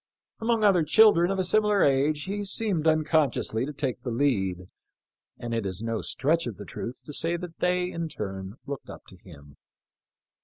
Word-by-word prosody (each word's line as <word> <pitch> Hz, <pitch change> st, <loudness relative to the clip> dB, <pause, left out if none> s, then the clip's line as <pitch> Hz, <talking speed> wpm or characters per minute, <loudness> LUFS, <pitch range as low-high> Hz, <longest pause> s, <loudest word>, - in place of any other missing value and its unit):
Among 225 Hz, -1 st, +1 dB
other 195 Hz, -4 st, +5 dB
children 175 Hz, +1 st, +5 dB
of 195 Hz, -, -1 dB
a 185 Hz, -, +1 dB
similar 210 Hz, +2 st, +3 dB
age 145 Hz, +2 st, +2 dB
he 205 Hz, +2 st, -3 dB
seemed 195 Hz, -5 st, -1 dB
unconsciously 155 Hz, -6 st, +1 dB
to -, -, -4 dB
take 135 Hz, -6 st, -3 dB
the 125 Hz, -, -4 dB
lead, 100 Hz, -9 st, 0 dB, 0.7 s
and 120 Hz, -1 st, -5 dB
it 115 Hz, -1 st, -1 dB
is 95 Hz, +2 st, -4 dB
no 115 Hz, -1 st, -2 dB
stretch 160 Hz, +2 st, 0 dB
of 115 Hz, -, -6 dB
the 100 Hz, -, -8 dB
truth 120 Hz, +5 st, -7 dB
to 150 Hz, -, -8 dB
say 165 Hz, +4 st, 0 dB
that 170 Hz, -1 st, -9 dB
they, 180 Hz, 0 st, +1 dB
in 165 Hz, -1 st, -4 dB
turn, 95 Hz, -4 st, -6 dB
looked 140 Hz, -1 st, -7 dB
up -, -, -10 dB
to 95 Hz, -, -13 dB
him. 70 Hz, -5 st, -16 dB
150 Hz, 185 wpm, -27 LUFS, 115-180 Hz, 0.7 s, other